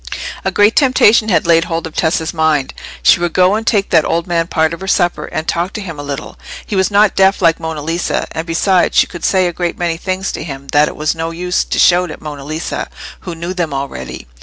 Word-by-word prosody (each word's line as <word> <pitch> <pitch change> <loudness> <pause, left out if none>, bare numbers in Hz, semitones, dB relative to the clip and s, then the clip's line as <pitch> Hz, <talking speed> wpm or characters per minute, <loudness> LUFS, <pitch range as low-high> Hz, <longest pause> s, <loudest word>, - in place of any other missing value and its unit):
A - - +1
great 205 +2 +3
temptation 235 -5 +4
had 180 - +2
laid 165 0 +4
hold 165 0 -3
of 160 - -8
Tessa's 160 0 0
mind; 155 -4 +1 0.3
she - - +5
would 175 -1 -1
go 185 +1 +4
and 220 +2 -2
take 205 -3 +1
that 160 -3 +5
old 170 0 -1
man 170 -2 0
part 160 -1 +1
of 170 - -8
her 190 - -6
supper, 175 -5 +1
and 155 +1 -5
talk 175 +4 -1
to - - -5
him 165 -6 -7
a - - -5
little. 140 -1 -6 0.3
He 210 - -4
was 190 -1 +2
not 205 0 +3
deaf 195 +1 +3
like 165 -2 +3
Monna 160 -2 -5
Lisa, 165 +3 -2
and 160 +2 -5
besides 180 +2 +2
she - - +6
could 175 - -10
say 185 -1 +2
a 175 - -1
great 175 0 -3
many 170 -2 -1
things 185 +2 -3
to - - -5
him 140 -3 -8
that 150 +2 +3
it - - -6
was 155 0 -1
no 165 0 -3
use 180 +2 -1
to - - -3
shout 180 0 +4
at - - -8
Monna 145 -2 -8
Lisa, 155 +3 -4 0.3
who 175 -2 -7
knew 170 +2 -5
them 170 -6 -2
already. 100 - -6
170 Hz, 245 wpm, -15 LUFS, 160-185 Hz, 0.3 s, she